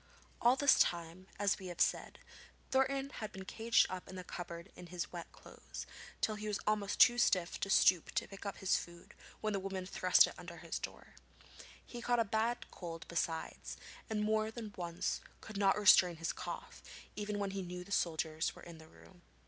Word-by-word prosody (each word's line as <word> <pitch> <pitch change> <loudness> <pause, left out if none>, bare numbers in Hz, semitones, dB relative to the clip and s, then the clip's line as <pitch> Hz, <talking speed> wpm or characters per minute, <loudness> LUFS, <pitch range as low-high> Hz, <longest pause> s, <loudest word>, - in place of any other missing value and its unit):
All 240 +2 +6
this 280 0 +5
time, 170 +2 0
as 205 0 +1
we 190 - -7
have 175 - -7
said, - - +1 0.5
Thornton 270 +1 +1
had 215 -4 -6
been 190 0 -8
caged 225 +4 +3
up 185 -1 -6
in 190 - -8
the 185 - -6
cupboard 170 -1 -7
in 180 - -10
his 175 0 -4
wet 170 -1 -7
clothes, - - -10 0.4
till 215 - +2
he 210 0 -5
was 210 -1 0
almost 210 -2 0
too 240 -1 +7
stiff 180 -6 +2
to 195 - -2
stoop 180 -3 +5
to - - 0
pick 195 - -10
up 200 -1 -4
his 190 -1 +2
food 170 0 -11 0.3
when 215 -1 0
the 200 - 0
woman 190 -1 -4
thrust 185 -1 +5
it - - -6
under 170 -1 -9
his 165 0 -4
door. - - -8 0.7
He 240 - -8
caught 240 0 +2
a 230 - +3
bad 220 +3 0
cold 165 -2 -7
besides, 165 -1 -3 0.3
and 215 -1 0
more 215 0 +1
than 220 -2 -7
once 170 -1 -2 0.2
could 215 -2 -8
not 195 0 +4
restrain 185 -4 +7
his 165 +1 -2
cough, - - -7 0.3
even 210 0 -3
when 200 -1 -1
he 195 0 -3
knew 180 0 -6
the 200 - -14
soldiers 160 -3 0
were - - -13
in 170 -2 -10
the 160 - -13
room. 175 +2 -18
195 Hz, 200 wpm, -35 LUFS, 175-215 Hz, 0.7 s, too